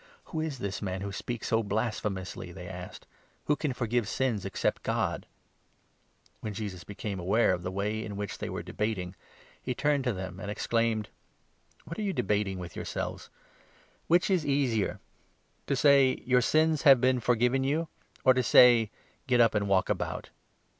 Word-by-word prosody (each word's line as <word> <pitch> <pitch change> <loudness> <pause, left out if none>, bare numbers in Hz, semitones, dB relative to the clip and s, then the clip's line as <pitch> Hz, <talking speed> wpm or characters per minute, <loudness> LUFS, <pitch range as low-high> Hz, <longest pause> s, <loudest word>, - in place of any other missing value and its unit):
"Who 160 - -1
is 155 -4 -3
this 100 -5 -4
man 95 -2 -3
who 100 0 -4
speaks 120 +4 -4
so 115 0 +3
blasphemously?" 105 -4 -3
they 90 0 -9
asked. 90 0 -8 0.2
" - - -38
Who 150 - +2
can 150 -1 -2
forgive 120 -3 -1
sins 115 -5 -1
except 95 - -1
God? - - -1 0.5
" - - -37
When 105 -2 -5
Jesus 100 -5 -5
became 100 0 -5
aware 95 +4 +3
of 90 - -3
the 90 - -3
way 105 +3 -2
in 105 -2 -6
which 100 -1 -5
they - - -4
were - - -4
22 - - -21
debating, 100 -4 -2 0.5
he 125 - -3
turned 145 0 +1
to 125 - +2
them 95 -1 -6
and 100 - -6
exclaimed: 110 0 0 0.8
"What 165 +6 -7
are - - -1
you 200 -2 -1
debating 100 - 0
with 90 -2 -8
yourselves? - - -5 0.8
Which 175 +4 +3
is 185 -3 +3
the 150 - -7
23 140 0 +2
easier? 115 -6 -1 0.3
— - - -41
to 140 - +1
say 135 -1 +5
' - - -26
Your 125 0 +4
sins 155 +4 +2
have 135 -4 +7
been 130 0 +3
forgiven 125 +3 +2
you 155 +5 0 0.2
'? - - -30
or 130 - +7
to 130 - +2
say 120 -2 +6 0.2
' - - -37
Get 125 -2 +3
up, 115 -2 +5
and 100 -2 0
walk 95 -1 +3
about - - -3
115 Hz, 195 wpm, -29 LUFS, 100-130 Hz, 0.8 s, have